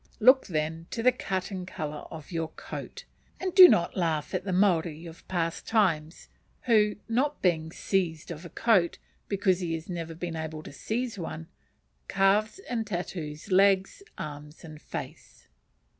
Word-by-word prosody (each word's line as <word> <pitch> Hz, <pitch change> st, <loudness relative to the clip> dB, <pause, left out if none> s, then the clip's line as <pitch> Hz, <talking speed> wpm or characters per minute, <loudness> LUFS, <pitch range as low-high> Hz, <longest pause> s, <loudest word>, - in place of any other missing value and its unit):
Look, 255 Hz, +4 st, +6 dB
then, 160 Hz, -1 st, -2 dB
to 230 Hz, -, -4 dB
the 255 Hz, -, +6 dB
cut 190 Hz, -6 st, -3 dB
and 185 Hz, -2 st, -5 dB
colour 150 Hz, -4 st, -5 dB
of 160 Hz, 0 st, -10 dB
your 165 Hz, -2 st, -1 dB
coat, -, -, -8 dB, 0.3 s
and 370 Hz, -1 st, -2 dB
do 370 Hz, -1 st, +11 dB
not 170 Hz, -, +2 dB
laugh 160 Hz, -4 st, -1 dB
at 185 Hz, 0 st, -2 dB
the 190 Hz, -, -2 dB
Maori 175 Hz, -4 st, +2 dB
of 165 Hz, 0 st, -12 dB
past 165 Hz, -2 st, -2 dB
times, 170 Hz, -8 st, +1 dB, 0.3 s
who, 210 Hz, -3 st, +3 dB
not 265 Hz, +6 st, 0 dB
being 160 Hz, -3 st, +2 dB
"seised" 170 Hz, -4 st, -1 dB
of 165 Hz, 0 st, -7 dB
a 170 Hz, -, -9 dB
coat, 190 Hz, -6 st, +2 dB, 0.3 s
because 190 Hz, -2 st, +1 dB
he 170 Hz, -3 st, -2 dB
has 160 Hz, 0 st, -7 dB
never 165 Hz, -2 st, -5 dB
been 170 Hz, 0 st, -4 dB
able 160 Hz, -1 st, -5 dB
to -, -, -10 dB
seize 225 Hz, -, -3 dB
one, 165 Hz, 0 st, -6 dB, 0.6 s
carves 200 Hz, -, +2 dB
and 230 Hz, -3 st, -2 dB
tattoos 175 Hz, -3 st, -5 dB
legs, 195 Hz, -, +3 dB, 0.2 s
arms, 150 Hz, +1 st, -8 dB
and 155 Hz, -2 st, -11 dB
face. -, -, -8 dB
175 Hz, 160 wpm, -28 LUFS, 160-205 Hz, 0.6 s, do